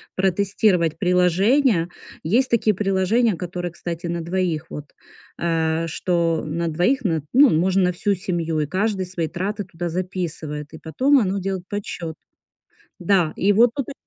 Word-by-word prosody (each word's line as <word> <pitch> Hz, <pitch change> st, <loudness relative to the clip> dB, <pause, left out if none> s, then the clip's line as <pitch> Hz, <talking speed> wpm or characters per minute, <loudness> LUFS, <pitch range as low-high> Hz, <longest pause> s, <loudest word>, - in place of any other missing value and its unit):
протестировать 190 Hz, -3 st, +1 dB
приложения. 180 Hz, -, +3 dB, 0.4 s
Есть 240 Hz, +11 st, +2 dB
такие 220 Hz, -2 st, +2 dB
приложения, 200 Hz, +3 st, +1 dB
которые, 175 Hz, 0 st, -5 dB
кстати, 170 Hz, 0 st, -6 dB
на 170 Hz, 0 st, -2 dB
двоих 170 Hz, -2 st, -1 dB
вот. 150 Hz, -, -7 dB, 0.5 s
А 165 Hz, -1 st, 0 dB
что 165 Hz, 0 st, 0 dB
на 170 Hz, +2 st, -2 dB
двоих? 185 Hz, -, +1 dB
Н 160 Hz, -5 st, 0 dB
ну, 275 Hz, +1 st, +6 dB
можно 185 Hz, +4 st, +2 dB
на 180 Hz, -, +2 dB
всю 200 Hz, +3 st, 0 dB
семью, 170 Hz, -3 st, -2 dB
и 150 Hz, -, +1 dB
каждый 190 Hz, +3 st, -1 dB
свои 175 Hz, -3 st, -3 dB
траты 200 Hz, +5 st, -3 dB
туда 175 Hz, -2 st, -6 dB
записывает, 165 Hz, -4 st, -4 dB
и 160 Hz, -, -8 dB
потом 265 Hz, -, +2 dB
оно 200 Hz, -3 st, 0 dB
делает 190 Hz, -1 st, -3 dB
подсчёт. 175 Hz, -5 st, -5 dB, 0.8 s
Да, 180 Hz, -3 st, +2 dB
и 205 Hz, +2 st, +2 dB
вот 230 Hz, +3 st, +5 dB
тут 275 Hz, -2 st, -3 dB
ы 285 Hz, -, -6 dB
180 Hz, 155 wpm, -22 LUFS, 165-200 Hz, 0.8 s, ну